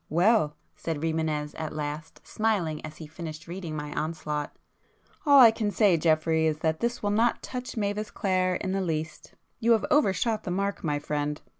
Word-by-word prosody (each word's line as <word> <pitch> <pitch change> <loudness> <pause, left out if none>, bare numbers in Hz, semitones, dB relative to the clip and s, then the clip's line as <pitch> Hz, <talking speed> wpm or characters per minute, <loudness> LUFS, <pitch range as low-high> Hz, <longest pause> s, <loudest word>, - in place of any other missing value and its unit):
"Well," 175 -2 +3 0.2
said 165 -2 -3
Rimânez 160 -2 -1
at 155 -1 -4
last, 150 +2 -6
smiling 195 -9 -1
as 155 0 -8
he 160 - -8
finished 155 0 -8
reading 170 -2 -5
my 150 -1 -5
onslaught—"all 155 - -1
I 235 -3 +10
can 220 -2 -1
say 205 -3 +4
Geoffrey, 160 0 +2
is 155 -1 0
that 160 -1 0
this 235 0 -2
will 205 - +1
not 230 +3 +2
touch 250 -1 -6
Mavis 205 0 -1
Clare 185 -2 0
in 185 - -2
the 195 0 0
least. 160 -3 -4 0.2
You 235 0 +4
have 220 - +2
overshot 220 - +2
the - - -5
mark, 200 +2 -2
my 150 -3 0
friend! 150 0 -2
165 Hz, 175 wpm, -27 LUFS, 155-205 Hz, 0.2 s, I